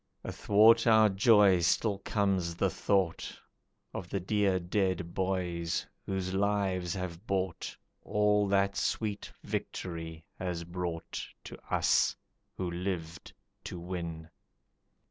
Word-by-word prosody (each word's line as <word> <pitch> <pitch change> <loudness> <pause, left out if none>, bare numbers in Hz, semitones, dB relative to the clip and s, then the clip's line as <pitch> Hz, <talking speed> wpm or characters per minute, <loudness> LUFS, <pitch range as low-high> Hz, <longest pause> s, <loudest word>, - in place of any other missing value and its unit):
Athwart 115 +3 +4
our 110 -1 +6
joy 100 -2 +5
still 95 +4 +1
comes 95 -5 0
the - - +1
thought 95 -5 0 0.5
Of 90 - -6
the 100 - -1
dear 95 0 +1
dead 90 -1 -1
boys, 90 -3 -1 0.2
whose 95 -1 -2
lives 95 -3 0
have 90 +2 -6
bought 95 -3 -2 0.2
All 105 0 +2
that 100 0 +2
sweet 105 +1 -2
victory 80 -2 -5 0.2
has 90 -2 -3
brought 85 -1 -4 0.2
To - - -8
us - - +3 0.4
who 90 -2 -2
lived 85 -2 -4 0.3
to - - -5
win. 85 -2 -5
95 Hz, 110 wpm, -31 LUFS, 85-100 Hz, 0.5 s, our